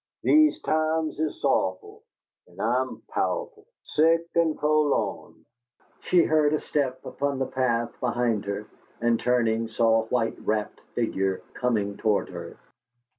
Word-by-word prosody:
These 310 0 +5
times 155 0 0
is 155 -1 -2
sow'owful, 430 +1 0 0.5
an' - - -18
I - - +2
am - - -6
pow'owful 475 -4 -2 0.2
Sick 165 +2 +2
an' 165 -2 +2
fo'lawn!" 150 -1 0 0.5
She 175 -2 +3
heard 155 -1 +3
a - - -1
step 130 -3 -2
upon 140 -1 -2
the 130 - 0
path 120 -3 0
behind 120 -4 0
her, 100 +1 -4 0.3
and, 120 -1 +2
turning, 115 -2 +1
saw 115 0 +3
a - - -7
white 115 -1 -1
wrapped 105 -1 -2
figure 95 -5 -1
coming 105 -5 -1
toward 105 -2 +1
her. - - -8
125 Hz, 135 wpm, -26 LUFS, 115-155 Hz, 0.5 s, These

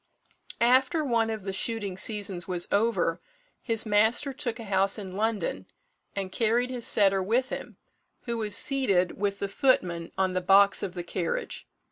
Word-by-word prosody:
After 260 +6 +3
one 230 -3 +1
of 220 -3 -4
the 195 0 -4
shooting 205 -1 -2
seasons 195 -3 -2
was 180 -2 0
over, 225 +3 +1 0.4
his 225 -2 -1
master 220 +6 +2
took 255 -4 -3
a - - -6
house 195 -1 +1
in 190 -3 -7
London, 220 0 -2 0.5
and 195 -2 -4
carried 235 +4 +1
his 245 -2 -2
setter 195 -2 +3
with 240 +7 0
him, - - -7 0.5
who 235 -2 -3
was 210 -2 -1
seated 200 -11 +2
with 200 -1 -1
the 200 - -3
footman 180 -7 0
on 190 -1 +1
the 185 - -1
box 195 +2 +4
of 190 -2 -5
the 175 - -4
carriage. 170 -1 -4
205 Hz, 165 wpm, -27 LUFS, 190-235 Hz, 0.5 s, box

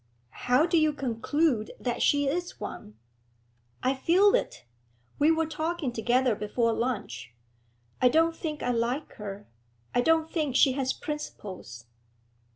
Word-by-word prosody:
'How 250 +5 +2
do 340 -1 +3
you 310 -1 +2
conclude 270 -1 0
that 245 -1 -2
she 285 -1 +3
is 350 +5 -3
one?' 105 +1 -8 0.9
'I 260 +2 +2
feel 375 +8 +4
it; - - -1 0.5
we 295 +2 +5
were 325 0 +2
talking 315 -3 -3
together 245 +2 +2
before 225 +3 0
lunch. 210 - -3 0.7
I 250 - +6
don't 325 +4 +3
think 310 -3 -5
I 245 - +1
like 245 +5 -1
her; 205 -1 -7 0.5
I 245 - +3
don't 320 +3 +3
think 300 -7 -1
she 270 - +6
has 260 0 -1
principles.' 190 - -7
265 Hz, 140 wpm, -28 LUFS, 235-315 Hz, 0.9 s, I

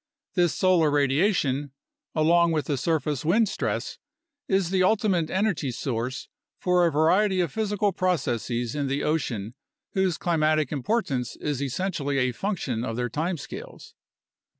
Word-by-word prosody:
This 175 -3 +2
solar 180 -4 +3
radiation, 145 -1 +1 0.4
along 170 +2 +4
with 155 -2 0
the 145 - 0
surface 150 -1 -1
wind 210 +8 +3
stress, 115 - -3 0.5
is 190 -2 +1
the 190 -1 +2
ultimate 185 -4 +2
energy 190 -8 0
source 125 0 -3 0.3
for 180 -1 +3
a - - 0
variety 185 +6 +3
of 170 -5 0
physical 210 0 0
processes 125 - -1
in 145 -2 -1
the 140 +2 -1
ocean 115 -9 -1 0.4
whose 190 -3 +1
climatic 155 -4 +1
importance 140 - -1
is 145 -3 -3
essentially 145 0 -2
a 130 -1 +2
function 130 - -2
of 115 -2 -3
their 120 0 -1
time 165 +8 -2
scales. 140 - -9
155 Hz, 140 wpm, -26 LUFS, 135-185 Hz, 0.5 s, along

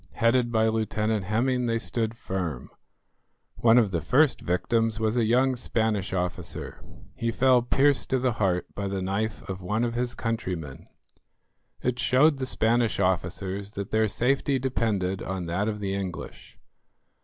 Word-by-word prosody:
Headed 120 +1 +2
by 110 -1 +3
Lieutenant 110 -2 0
Hemming 125 +4 +1
they 115 0 +1
stood 115 -1 -2
firm. 90 - -4 0.9
One 115 0 +5
of 110 -5 +4
the 85 -3 -1
first 130 - +3
victims 115 +5 0
was 110 +1 0
a 120 -2 +2
young 130 +3 +3
Spanish 110 -4 -1
officer. 90 -1 -4 0.3
He 115 - -2
fell 130 +1 +4
pierced 135 +3 +2
to 130 - +2
the 130 0 +1
heart 95 -6 0
by 100 0 -3
the 95 -1 -3
knife 105 +4 -2
of 95 -1 -5
one 105 +6 -1
of 120 -1 -1
his 120 0 -2
countrymen. 90 - -4 1.0
It 125 0 -1
showed 140 +2 +4
the 130 - -2
Spanish 115 -2 +1
officers 95 +2 -1
that 100 -1 -5
their 110 0 +3
safety 135 +5 +1
depended 110 -8 -1
on 95 -2 -4
that 90 +5 -1
of 105 -1 -2
the 100 -1 -2
English. 95 -3 -6
110 Hz, 155 wpm, -26 LUFS, 95-120 Hz, 1.0 s, One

